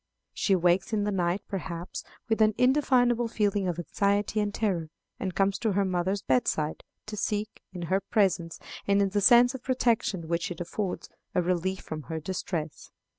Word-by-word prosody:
She 195 - +2
wakes 180 +3 +2
in 210 -1 +1
the 205 - 0
night, 180 0 0
perhaps, 175 -3 -5 0.2
with 225 -1 +1
an 215 -1 +4
indefinable 250 -3 +3
feeling 205 -3 0
of 175 -2 -1
anxiety 200 +4 0
and 205 -1 0
terror, 190 -7 -1 0.3
and 185 -3 -3
comes 195 0 +2
to 220 -4 0
her 200 +1 +2
mother's 185 +2 -1
bedside, 150 +4 0 0.2
to 215 - -6
seek, 210 +1 -2
in 180 -2 -6
her 190 +4 +1
presence, 185 -5 +1 0.3
and 200 0 +4
in 200 -1 +3
the 205 +1 0
sense 245 +4 +6
of 265 - -7
protection 230 -9 0
which 170 +1 -1
it 175 - -6
affords, 180 +2 -3 0.3
a 180 - +3
relief 185 +2 -1
from 155 -1 -6
her 160 -1 -2
distress. 165 -2 -4
195 Hz, 180 wpm, -28 LUFS, 175-215 Hz, 0.3 s, sense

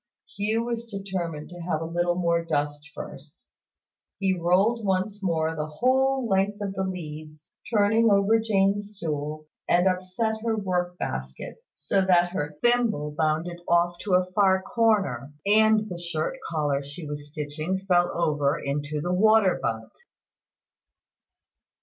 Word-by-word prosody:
Hugh 215 +3 0
was 235 0 -4
determined 185 -7 -5
to 175 - -9
have 165 -2 -2
a 165 - -4
little 175 +1 0
more 170 -1 +1
dust 145 0 -2
first. - - -9 0.8
He 195 -1 +1
rolled 190 +7 +2
once 195 +1 -1
more 165 -3 0
the 155 -1 -3
whole 260 - +1
length 200 +1 +1
of 200 -2 -3
the 195 - -3
leads, 155 -5 -6 0.2
turned 220 +1 +4
over 200 +2 +4
Jane's 205 -1 0
stool, 155 -2 -4 0.2
and 175 +2 +4
upset 190 +4 -1
her 225 -1 0
work 180 -3 -1
basket, 65 - -6
so 195 - 0
that 175 -2 +3
her 150 -4 -4
thimble 235 -11 +2
bounded 160 +3 -1
off 175 0 +2
to 195 -3 +1
a 180 0 +3
far 190 -1 +3
corner, 205 - +1
and 215 +1 +4
the 175 -4 -6
shirt 170 +7 -3
collar 145 -4 0
she 145 +4 -8
was 145 0 -7
stitching 155 +4 -3
fell 180 -2 +2
over 150 -2 +1
into 145 +2 -3
the 175 +3 -1
water 215 0 +4
butt. 110 0 -3
180 Hz, 145 wpm, -26 LUFS, 155-205 Hz, 0.8 s, turned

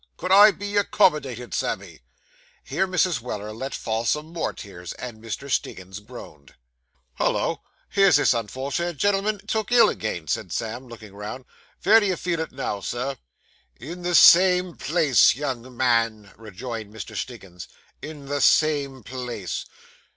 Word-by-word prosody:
Could 185 - -4
I 205 +2 +9
be 205 0 -4
accommodated, 135 - +1
Sammy?' - - -3 0.6
Here 160 +8 -1
Mrs. 185 -7 +1
Weller 105 -3 -5
let 130 +4 -5
fall 110 0 -2
some 150 +6 -1
more 170 - -2
tears, 90 -3 -9
and 120 -3 -9
Mr. 115 +5 -6
Stiggins 95 -6 -3
groaned. 105 - -13 0.6
'Hollo! - - 0 0.3
Here's 195 -5 +4
this 145 -3 +4
unfortunate 135 +9 -3
gen'l'm'n 205 +3 0
took 220 +1 -2
ill 235 -3 +6
agin,' 90 -7 -4
said - - -2
Sam, 120 +3 -4
looking 110 -4 -12
round. 105 +6 -7 0.4
'Vere 215 +5 +6
do 205 - 0
you 185 - +1
feel 175 -1 -2
it 160 - -4
now, 130 -6 -3
sir?' 125 +7 -3 0.6
'In 170 +9 -8
the 175 0 0
same 180 0 +6
place, 150 -4 +3
young 130 -3 -5
man,' 115 -5 +1
rejoined 110 +1 -7
Mr. 110 -1 -8
Stiggins, 95 -8 -7 0.3
'in 145 -1 -9
the 145 +1 -2
same 140 -5 +2
place. 120 -5 -5
130 Hz, 145 wpm, -24 LUFS, 110-175 Hz, 0.6 s, I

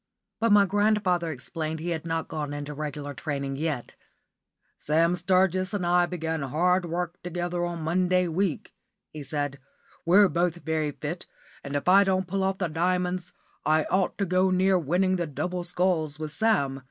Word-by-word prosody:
But 230 -1 +2
my 205 -1 +7
grandfather 195 -4 +1
explained 155 +3 -4
he 170 +3 -4
had 165 0 -3
not 165 0 -2
gone 150 -2 -4
into 145 0 -5
regular 145 -1 -5
training 140 -2 -3
yet. 150 -5 -3 0.8
"Sam 165 +3 +2
Sturgess 185 +2 +1
and 185 -3 -1
I 175 0 +3
begin 160 -3 -3
hard 175 +7 +1
work 175 +1 -4
together 175 0 -3
on 170 -2 -3
Monday 180 +2 +2
week," 170 -1 -2 0.4
he 155 - -8
said. 145 -1 -3 0.4
"We're 195 +4 +6
both 175 -1 0
very 160 -3 -1
fit, 155 +4 -5 0.4
and 140 0 -5
if 145 - -2
I 195 +2 +7
don't 190 -1 0
pull 195 +2 -1
off 190 0 0
the 180 - -1
'Diamonds,' 180 +2 -1 0.3
I 155 +1 +3
ought 190 -1 +1
to 200 - 0
go 185 +1 +2
near 185 0 +3
winning 180 +4 +1
the 170 -2 -2
'double 180 +5 -3
sculls' 175 -4 0
with 155 -1 -5
Sam. 145 -8 +1
175 Hz, 170 wpm, -27 LUFS, 155-185 Hz, 0.8 s, my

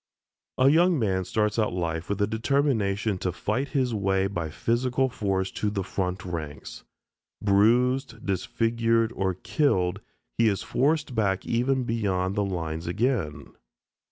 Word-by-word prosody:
A 130 +1 +5
young 170 +3 +4
man 95 -6 0
starts 105 +2 0
out 105 -4 +1
in - - -4
life 85 -1 -2
with 100 - 0
the 105 - +2
determination 110 -4 0
to 90 - -1
fight 110 +10 -2
his 130 -3 0
way 95 -2 +1
by 85 -5 -3
physical 125 +9 0
force 95 -5 -1
to 105 - -1
the 100 -2 -2
front 95 +1 -3
ranks. 80 -5 -6 0.6
Bruised, 115 +4 +2
disfigured, 115 +3 +1
or 95 -1 0
killed, 95 - 0 0.4
he 115 - +5
is 100 -3 0
forced 145 +1 0
back 100 -4 0
even 125 +3 +1
beyond 100 -5 -1
the 105 0 0
lines 85 -4 -3
again. 90 - -1
105 Hz, 145 wpm, -26 LUFS, 95-120 Hz, 0.6 s, A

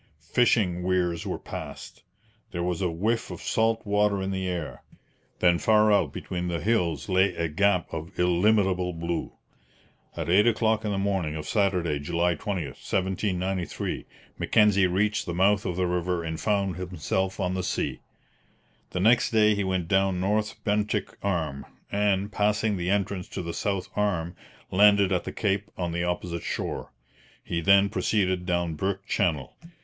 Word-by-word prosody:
Fishing 105 -8 +3
weirs 90 -2 0
were - - -2
passed. - - -8 0.5
There 85 -1 -3
was 90 0 -1
a 90 - +1
whiff 110 +8 -1
of - - -7
salt 115 0 0
water 105 0 +2
in 95 0 -2
the 95 -1 -2
air; 85 -4 -4 0.6
then 85 -1 +4
far 110 -1 +4
out 100 - +2
between 90 -1 -4
the 85 -1 -2
hills 85 - 0
lay 95 -1 +2
a 85 0 -1
gap 90 +3 +1
of 80 +4 -6
illimitable 90 0 +2
blue. 85 0 -3 0.8
At 80 -2 -3
eight 100 +6 +4
o'clock 110 -1 +2
in 105 - -1
the 100 - -1
morning 95 -6 -1
of 75 -1 -6
Saturday, 90 -8 +1
July 85 +4 0
20, 95 +2 -3
1793, 95 +3 -2 0.3
Mackenzie 105 -3 +4
reached 100 +4 0
the 85 - -3
mouth 100 +2 +3
of 90 - -2
the 90 0 0
river 90 -1 -1
and 80 0 -4
found 100 -3 0
himself 90 +1 -2
on 90 - 0
the 95 - -1
sea. 90 - -2 0.9
The - - -3
next 115 +6 +4
day 110 -1 +4
he 100 -1 -1
went 95 -3 -1
down 95 -1 +2
North 105 +3 0
Bentinck 105 0 -1
Arm, 80 -8 -2 0.3
and, 100 0 +1
passing 105 +1 +1
the 90 -1 -2
entrance 100 -2 -1
to - - -5
the 85 0 -4
south 100 -3 -2
arm, 90 -5 -1 0.4
landed 100 0 +5
at 90 - 0
the - - -4
cape 100 -1 -1
on 90 -2 -2
the 85 +1 -1
opposite 90 -1 -3
shore. - - -4 0.5
He 85 -1 -2
then 100 +3 +5
proceeded 95 -3 0
down 85 -2 0
Burke 95 +5 -2
Channel. 80 - -1
95 Hz, 165 wpm, -26 LUFS, 85-100 Hz, 0.9 s, landed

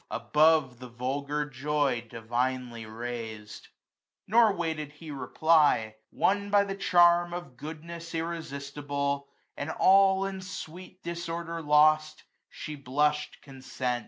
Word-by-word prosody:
Above 150 -5 +2
the 125 - -9
vulgar 140 +5 -3
joy 145 -2 0
divinely 120 0 -3
raised. 110 -2 -7 0.6
Nor 225 +1 +5
waited 160 -5 -3
he 155 +1 -10
reply. 145 -4 +2 0.2
Won 200 +1 +1
by 205 0 +5
the 195 -1 -4
charm 175 -2 +4
Of 175 -8 -8
goodness 165 +4 -8
irresistible, 140 -3 -3 0.3
and 145 - -4
all* 195 +2 +4
In 195 -1 -5
sweet 185 -1 -9
disorder 170 -1 -4
lost, 155 0 +3 0.3
she 155 - -7
blush'd 150 +2 -1
consent. 130 -2 -4
150 Hz, 110 wpm, -28 LUFS, 130-170 Hz, 0.6 s, Nor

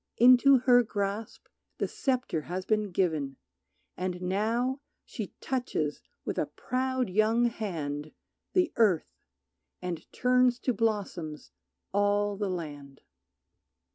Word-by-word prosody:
Into 255 +3 +7
her 245 0 +5
grasp 205 -1 -3 0.3
the - - 0
sceptre 250 - -1
has 185 +1 -3
been 215 0 +1
given 160 -7 0 0.6
And 180 -1 -3
now 225 +9 0 0.2
she - - -6
touches 245 - -2 0.2
with - - -2
a - - 0
proud 260 -1 -1
young 215 +5 +3
hand 155 -10 -3 0.4
The 360 -3 +2
earth, 200 -8 +3 0.7
and 175 -3 -5
turns 250 0 +3
to 250 - +1
blossoms 195 - -2 0.4
all 205 0 +2
the 205 0 -2
land. 145 -6 -6
205 Hz, 110 wpm, -29 LUFS, 175-245 Hz, 0.7 s, Into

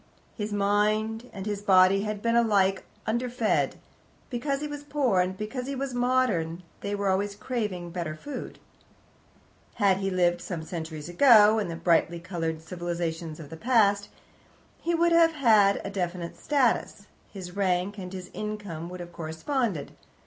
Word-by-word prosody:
His 210 -1 -4
mind 215 +3 +1
and 195 -1 -7
his 205 -1 -3
body 190 -1 +5
had 210 0 -4
been 230 0 +2
alike 200 -5 +3 0.2
underfed, 235 0 0 0.6
because 275 +3 -1
he 300 - -2
was 290 -1 -6
poor, 275 -10 +1
and 185 +1 -2
because 245 +5 -4
he 275 - -3
was 270 -1 -3
modern 245 -10 +1 0.2
they 200 0 -3
were 200 0 -1
always 200 +2 0
craving 205 -7 -3
better 170 -3 -4
food. 270 - -7 1.2
Had 200 -4 +3
he 195 0 -1
lived 175 -2 +2
some 170 -4 -5
centuries 160 -2 -6
ago, 215 +2 +6
in 205 - -1
the 165 - -4
brightly 170 0 +2
coloured 165 -2 -4
civilizations 170 -2 -4
of 155 -2 -10
the 160 - -7
past, 205 -1 +3 0.7
he 340 0 0
would 340 +1 +3
have 335 -1 +5
had 215 -8 +4
a 195 - -4
definite 180 -3 -3
status, 255 -7 0 0.3
his 185 -3 -8
rank 195 +1 0
and 185 -1 -6
his 185 -1 -8
income 205 -6 -5
would 180 0 -7
have 175 0 -9
corresponded. 170 - -2
200 Hz, 155 wpm, -27 LUFS, 175-230 Hz, 1.2 s, ago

